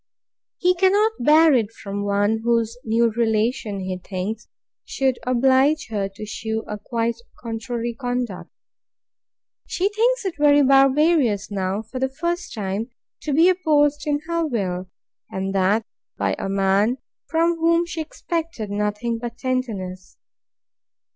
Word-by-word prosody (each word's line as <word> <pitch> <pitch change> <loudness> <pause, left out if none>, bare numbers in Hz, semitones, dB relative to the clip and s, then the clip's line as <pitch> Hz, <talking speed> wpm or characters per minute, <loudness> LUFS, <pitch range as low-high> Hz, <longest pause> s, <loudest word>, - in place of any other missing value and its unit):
He 360 +1 +3
cannot 395 +4 +3
bear 310 +4 +6
it 225 -4 +1
from 200 -2 -5
one 205 +2 +1
whose 230 -1 +1
new 230 +1 +2
relation, 220 -2 0
he 185 -1 -4
thinks, 195 +5 -5 0.4
should 265 -2 -1
oblige 265 +4 +3
her 200 -2 -1
to 215 - -7
shew 220 +1 -4
a 210 0 -5
quite 230 +2 -2 0.2
contrary 235 0 -4
conduct. 245 -5 -3 1.2
She 380 +3 0
thinks 465 +2 +1
it 380 - -1
very 290 -1 +5
barbarous, 270 - +3
now, 195 +1 -2
for 240 +4 -7
the 265 +1 0
first 345 +5 -3
time, 210 +2 -3 0.3
to 300 - -3
be 320 +5 +5
opposed 295 -5 +2
in 290 0 0
her 335 0 0
will, 190 - -2 0.4
and 190 0 -3
that 195 +4 +2 0.3
by - - 0
a - - -3
man 195 +5 +2 0.3
from 335 +1 +1
whom 335 +1 +3
she 335 -1 -4
expected 315 -8 -4
nothing 210 +3 -1
but 240 0 -6
tenderness. 205 -8 -4
235 Hz, 135 wpm, -22 LUFS, 210-300 Hz, 1.2 s, bear